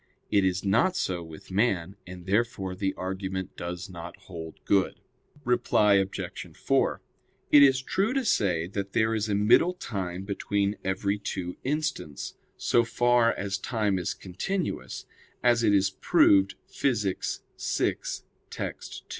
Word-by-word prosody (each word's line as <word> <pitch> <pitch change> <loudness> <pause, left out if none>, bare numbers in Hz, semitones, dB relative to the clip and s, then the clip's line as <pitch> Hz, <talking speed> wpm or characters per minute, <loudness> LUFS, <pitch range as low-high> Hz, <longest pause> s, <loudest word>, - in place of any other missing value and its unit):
It 100 -2 +4
is 95 +1 0
not 120 - +3
so 90 - -1
with 80 +1 -11
man; 95 -3 +1
and 90 -1 -9
therefore 100 -2 0
the 95 +1 -2
argument 95 0 -4
does 85 +1 -5
not 85 -1 -9
hold 80 -4 -9
good. 100 -2 +2 0.5
Reply 120 -4 +3
Obj. 95 0 -4
4: - - +1 0.5
It 145 - +9
is 135 -1 +5
true 195 - 0
to 270 -2 +1
say 90 - +2
that 100 +1 -5
there 110 0 +2
is 110 -1 -1
a 100 - +1
middle 115 - +4
time 95 - -4
between 100 0 -1
every 100 +2 -1
two 90 -3 -4
instants, 135 - -3 0.2
so 120 - +3
far 120 0 +3
as 100 0 -3
time 105 -3 0
is 90 - -2
continuous, 170 - -4 0.4
as 120 -1 +4
it 110 -3 +4
is 100 -1 +3
proved 95 0 +4
Phys. 105 -8 -1 0.2
vi, - - +1 0.5
text. - - -6
100 Hz, 140 wpm, -27 LUFS, 95-115 Hz, 0.5 s, It